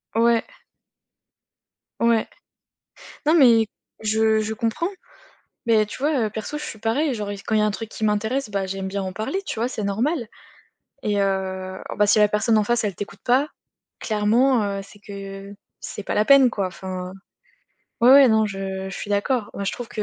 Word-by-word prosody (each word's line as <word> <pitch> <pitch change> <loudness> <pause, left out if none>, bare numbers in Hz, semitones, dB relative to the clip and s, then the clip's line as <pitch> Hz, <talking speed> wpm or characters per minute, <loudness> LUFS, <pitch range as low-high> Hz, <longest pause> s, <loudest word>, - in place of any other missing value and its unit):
Ouais. 230 0 +3 1.6
Ouais. 230 -1 +2 1.0
Non 310 - +5
mais 235 -8 +6 0.3
je 220 0 +2
je 215 +1 -3
comprends. 230 +9 -1 0.8
Mais 220 -2 +4
tu 210 - -9
vois, 290 +4 +1
heu, - - -2
perso, 220 +8 -5
je 300 - -6
suis 220 -7 -7
pareille, 265 +7 0
genre 210 -3 -4
il - - -4
s 200 - -12
quand 220 - -3
il - - +4
y - - +3
a - - +3
un - - +2
truc 220 +2 -6
qui 220 - -7
m'intéresse, 220 +4 0
bah 200 -1 -1
j'aime 190 0 -4
bien 195 +1 -3
en 185 -1 -5
parler, 220 - -3
tu - - -4
vois? 235 - +1
C'est 225 -4 -5
normal 235 +7 -1 0.8
et 205 -1 0
heu 190 -1 -2 0.2
bah 210 - +4
si 215 +1 +4
la 210 0 +5
personne 215 +2 +2
en 210 - +2
face, 240 +1 +1
elle 200 -3 -1
t'écoute 205 +3 -8
pas, 260 +4 +3 0.5
clairement, 225 +4 +2
heu, 200 -1 -2
c'est 200 +1 -16
que 200 0 -9 0.3
c'est 205 - -7
pas - - -3
la 210 - +3
peine 270 +1 +6
quoi. 200 -5 -1
Enfin, 185 0 -6 0.9
ouais, 240 +2 +7
ouais, 275 -1 +9
non, 220 -1 +4
je 190 -1 -5
je - - -7
suis - - -6
d'accord. 205 +2 0
Moi 200 - -4
je 195 - -1
trouve 245 -2 -7
que, 215 - -4
215 Hz, 200 wpm, -23 LUFS, 200-235 Hz, 1.6 s, ouais